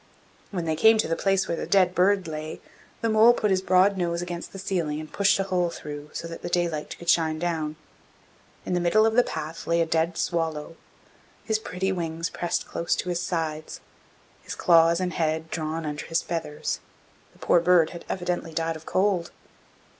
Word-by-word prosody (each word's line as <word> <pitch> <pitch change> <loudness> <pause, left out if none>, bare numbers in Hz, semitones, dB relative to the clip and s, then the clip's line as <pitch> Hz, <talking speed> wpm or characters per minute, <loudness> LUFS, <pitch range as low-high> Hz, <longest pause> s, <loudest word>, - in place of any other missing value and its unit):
When 175 -4 -3
they 160 -1 0
came 220 +7 +6
to 215 - +1
the 165 - 0
place 195 0 +1
where 170 - -1
the - - -4
dead 185 -2 +4
bird 190 0 +3
lay, 155 0 -5 0.4
the 230 - +1
mole 220 +2 +6
put 210 -4 0
his 185 -1 +2
broad 190 +1 +4
nose 170 -2 -1
against 175 -1 -5
the - - -9
ceiling 170 -6 -2
and 155 0 -9
pushed 200 -1 +3
a 195 - 0
hole 180 -2 0
through, 150 -2 -8
so 165 - -5
that 165 - -8
the - - -4
daylight 170 -3 -1
could 170 - -12
shine 160 -2 +3
down. 160 -2 -2 0.9
In - - -2
the 175 - +2
middle 195 +6 +4
of 225 - +2
the 245 - +6
path 160 -6 -6
lay 170 0 +2
a 165 - +3
dead 165 +1 0
swallow, 165 -2 -2 0.7
his 220 -1 +1
pretty 190 -3 -2
wings 165 -2 -3
pressed 175 - -2
close 170 - -1
to 180 - -3
his 175 0 -1
sides, 155 -3 -3 0.6
his - - -7
claws 170 0 +5
and 180 -2 -2
head 160 0 -1
drawn 160 0 -3
under 150 -1 -4
his 165 - 0
feathers; 165 -3 -3 0.5
the - - -22
poor 175 - +3
bird 170 -1 +4
had 170 - -9
evidently 180 -3 -3
died 165 0 -1
of 160 0 -11
cold. 185 -3 +1
170 Hz, 200 wpm, -26 LUFS, 160-185 Hz, 0.9 s, came